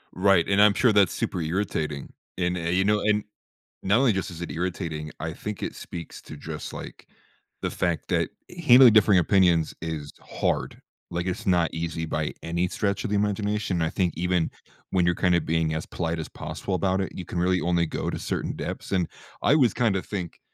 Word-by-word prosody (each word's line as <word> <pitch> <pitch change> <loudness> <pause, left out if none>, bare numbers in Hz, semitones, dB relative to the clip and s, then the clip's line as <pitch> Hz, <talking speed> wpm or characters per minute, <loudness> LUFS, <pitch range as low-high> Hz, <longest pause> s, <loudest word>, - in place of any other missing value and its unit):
Right 95 -2 +4
and 100 +1 +4
I'm 105 0 +7
sure 120 -4 +4
that's 100 -3 +4
super 90 - -2
irritating 80 -4 -2 0.2
and, 90 0 0
eh 85 -1 -2
you 90 +2 +2
know, 105 +1 +3
and 105 -1 +2 0.6
not 100 +3 +3
only 130 -4 +4
just 95 -2 -2
is 85 0 -9
it 85 - -4
irritating, 80 -3 -3
I 80 0 -3
think 105 +2 -6
it - - -4
speaks 85 -2 -8
to 75 - -10
just 75 +1 -6
like - - -9 0.5
the - - -2
fact 85 -2 -1
that - - +1 0.4
handling 125 -2 +9
differing 105 -3 +6
opinions 85 -2 +3
is 80 -3 -5
hard. - - -2 0.3
Like 85 0 -2
it's 110 +5 -3
not 85 -3 +2
easy 80 0 -3
by 75 -1 -2
any 85 +2 0
stretch 100 +2 -1
of - - -2
the 105 - 0
imagination. 105 -2 0
I 80 - +1
think 90 -1 0
even 90 -1 +1 0.4
when 90 -2 +2
you're 85 0 +2
kind 90 0 +2
of 85 - 0
being 80 -1 +1
as 80 0 -3
polite 85 -1 -3
as 80 - -5
possible 80 +5 -4
about 95 +1 +1
it, 95 - -3
you 90 - -6
can 85 - -4
really 90 +1 +2
only 85 -1 +2
go - - -3
to - - -4
certain - - -2
depths, - - -5
and 90 -4 +1 0.3
I - - +4
always 130 -8 +4
kinda 110 -6 +1
think 90 -5 -5
90 Hz, 205 wpm, -26 LUFS, 80-100 Hz, 0.6 s, handling